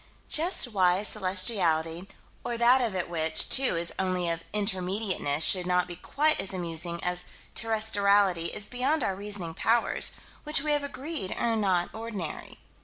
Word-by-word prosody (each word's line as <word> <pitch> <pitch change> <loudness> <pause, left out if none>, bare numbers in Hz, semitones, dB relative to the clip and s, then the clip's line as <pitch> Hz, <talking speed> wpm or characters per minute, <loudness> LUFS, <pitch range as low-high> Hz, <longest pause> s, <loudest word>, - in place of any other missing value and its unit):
Just 325 -4 +2
why 185 -2 +2
celestiality, 185 -4 +2 0.4
or 235 - -4
that 245 +2 +4
of 225 -5 -2
it 185 - -2
which, 160 -2 +1
too, 265 -6 +3
is 170 0 0
only 185 -2 -1
of 165 0 -4
Intermediateness 190 -6 -1
should 180 -2 +4
not 180 0 +1
be 175 - -7
quite 305 - +1
as 195 0 -1
amusing 170 -1 -2
as 180 0 -1 0.3
terrestriality 205 -5 +2
is 205 - -2
beyond 260 +5 -1
our 190 - -1
reasoning 200 -4 -5
powers, 230 +7 0 0.3
which 300 -2 +1
we 305 - 0
have 295 -1 0
agreed 280 - -6
are 230 -1 0
not 185 -5 0
ordinary. 215 -8 -7
195 Hz, 155 wpm, -27 LUFS, 175-230 Hz, 0.4 s, that